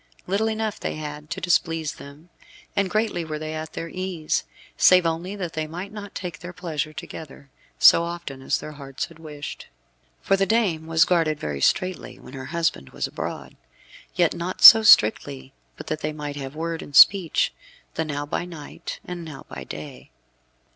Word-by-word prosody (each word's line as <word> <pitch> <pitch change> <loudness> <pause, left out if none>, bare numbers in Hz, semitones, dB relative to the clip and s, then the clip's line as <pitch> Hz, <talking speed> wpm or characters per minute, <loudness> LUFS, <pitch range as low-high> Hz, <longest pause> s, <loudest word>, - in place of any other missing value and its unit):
Little 200 +4 0
enough 220 -1 -3
had 150 -1 -5
they - - -27
to - - -5
displease 165 -3 0
them, 145 +5 -14 0.4
and 200 -2 +1
greatly 215 -4 0
were 155 -1 -5
they 155 0 -5
at 155 0 -6
their 165 - -5
ease, 180 -3 -2 0.3
save 180 -1 +6
only 170 +4 -2
that 180 -5 -5
they 155 -1 -3
might 180 +5 -7
not 205 -2 -9
take 175 -4 -6
their 175 +1 -8
pleasure 155 -4 -4
together, 145 -3 -10 0.3
so - - +7
often 170 -6 -6
as - - 0
their 155 - -8
hearts 135 -2 -6
had 165 -1 -17
wished. 150 -2 -8 0.5
For 195 - +2
the 195 0 +1
dame 185 -8 +1
was 160 0 +4
guarded 165 -4 +1
very 70 -2 -4
straitly 185 - 0
when 130 - -14
her 130 -1 -7
husband 165 - -2
was - - -3
abroad. - - -6 0.6
Yet 175 -3 +3
not 175 +2 -5
so 225 - +12
strictly 135 - +4 0.2
but - - -9
that 155 - -3
they 155 0 -2
might 150 -1 -6
have 135 0 -7
word 165 +1 -3
and 145 - -10
speech, 185 -2 +6 0.4
the 160 - -1
now 145 -2 -4
by 145 - -2
night 160 -5 -8
and 180 -1 -6
now 155 -4 -10
by 70 -2 -7
day. 75 +4 -9
160 Hz, 180 wpm, -24 LUFS, 150-180 Hz, 0.6 s, so